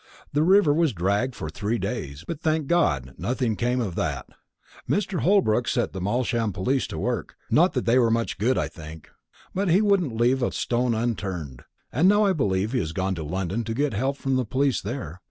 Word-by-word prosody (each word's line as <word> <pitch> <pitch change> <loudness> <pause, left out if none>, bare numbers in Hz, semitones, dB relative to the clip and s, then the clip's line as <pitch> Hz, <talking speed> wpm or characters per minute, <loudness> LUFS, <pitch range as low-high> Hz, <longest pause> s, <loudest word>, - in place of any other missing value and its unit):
The 145 - +2
river 180 -2 +5
was 160 -3 +2
dragged 100 +8 0
for - - -5
three 100 +10 -2
days; 70 -7 -4
but, 165 -2 -5
thank 155 -2 +1
God, 70 - +1
nothing 125 -3 -1
came 125 +3 0
of 105 -7 -2
that. - - -2 0.6
Mr. 195 -3 0
Holbrook 125 - +3
set - - 0
the 95 - -5
Malsham 115 +2 0
police 125 +8 0
to - - -6
work 120 -8 -3 0.2
not - - +4
that - - -1
they're 120 0 +4
much 115 -3 -1
good, 125 +5 +2
I - - 0
think; 80 -1 -11 0.4
but 195 0 0
he 175 +4 +5
wouldn't 195 - +2
leave 125 +3 +3
a 120 - +1
stone 120 -1 0
unturned. 95 - -3 0.3
And 165 +9 +4
now 205 +1 +4
I 195 - +3
believe 100 - 0
he 130 - +1
has 80 -5 -3
gone 95 +2 -1
to 85 -3 -5
London 95 +7 -2
to 115 0 -4
get 145 0 0
help 135 +7 -1
from 135 -2 0
the 130 - +1
police 135 +4 +1
there. 95 - -5
120 Hz, 205 wpm, -25 LUFS, 95-140 Hz, 0.6 s, river